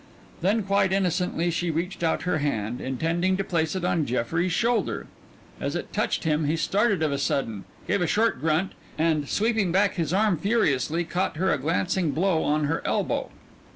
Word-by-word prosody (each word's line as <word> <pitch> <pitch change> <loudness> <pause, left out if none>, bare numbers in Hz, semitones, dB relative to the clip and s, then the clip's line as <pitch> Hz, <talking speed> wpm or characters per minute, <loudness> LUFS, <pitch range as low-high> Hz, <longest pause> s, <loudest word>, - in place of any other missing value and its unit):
Then 205 +5 +2
quite 195 -1 +2
innocently 180 -2 0
she 175 +1 -1
reached 170 +4 -3
out 165 -1 0
her 180 -3 0
hand, 120 -5 -2
intending 165 +8 0
to 195 - 0
place 165 -3 -1
it 185 -2 -2
on 165 -4 +1
Jeffrey's 165 +9 0
shoulder 235 +7 0 0.5
as - - -2
it - - -5
touched - - 0
him 155 -1 +1
he 150 +3 +1
started 200 -1 +1
of 155 - +1
a 140 - -1
sudden, 115 -8 -1 0.2
gave 200 - +1
a 175 - +2
short 225 +7 +1
grunt, 160 +4 +1 0.3
and, 155 -2 +1
sweeping 220 -4 +1
back 195 +2 +2
his 165 -3 -1
arm 200 -1 +2
furiously, 165 - +1
caught 175 +1 -2
her 185 +1 +2
a 145 - -1
glancing 170 +4 0
blow 170 -1 +2
on 150 +1 +1
her 150 +3 0
elbow. - - -1
170 Hz, 185 wpm, -25 LUFS, 155-190 Hz, 0.5 s, Then